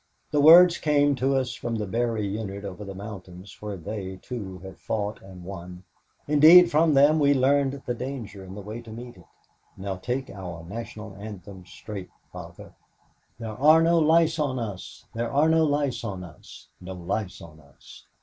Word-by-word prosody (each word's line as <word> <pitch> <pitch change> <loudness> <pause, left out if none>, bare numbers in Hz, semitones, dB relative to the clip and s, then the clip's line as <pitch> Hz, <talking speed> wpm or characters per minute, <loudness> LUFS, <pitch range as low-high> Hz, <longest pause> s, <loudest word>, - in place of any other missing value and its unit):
The 145 - +2
words 170 +3 +8
came 145 -2 +3
to 135 +2 +1
us 130 -3 -1
from 120 -1 -4
the 105 -2 -2
Berry 115 +1 -1
unit 100 -1 -5
over 100 +1 -7
the 100 -1 -8
mountain 95 -3 -9
where 105 -1 -6
they, 95 +2 -6
too, 100 -4 -7
have 95 0 -11
fought 105 -1 -3
and 95 -2 -12
won 90 -1 -9 0.4
indeed 160 +4 +8
from 155 0 +3
them 145 +3 +5
we 145 -1 +4
learned 140 +1 +1
the 120 - -1
danger 120 -6 -7
and 95 +1 -10
the - - -6
way 110 +4 -7
to 115 - -14
meet 120 +2 -9
it. 90 - -18 0.5
Now 95 0 -4
take 125 +7 -4
our 90 -4 -8
National 110 0 -8
Anthem 100 -3 -10
straight, 100 -3 -9 0.2
Father: - - -11 0.6
"There 115 -1 -6
are 155 +6 +5
no 170 0 +4
lice 160 +1 +3
on 140 -4 -1
us, 105 -6 -7
There 115 0 -3
are 145 +3 +3
no 160 0 +4
lice 145 -4 -1
on 95 -5 -5
us, 90 - -14
No 95 +1 -8
lice 95 +2 -4
on 80 -2 -13
us. 70 -3 -17
110 Hz, 180 wpm, -25 LUFS, 95-140 Hz, 0.6 s, words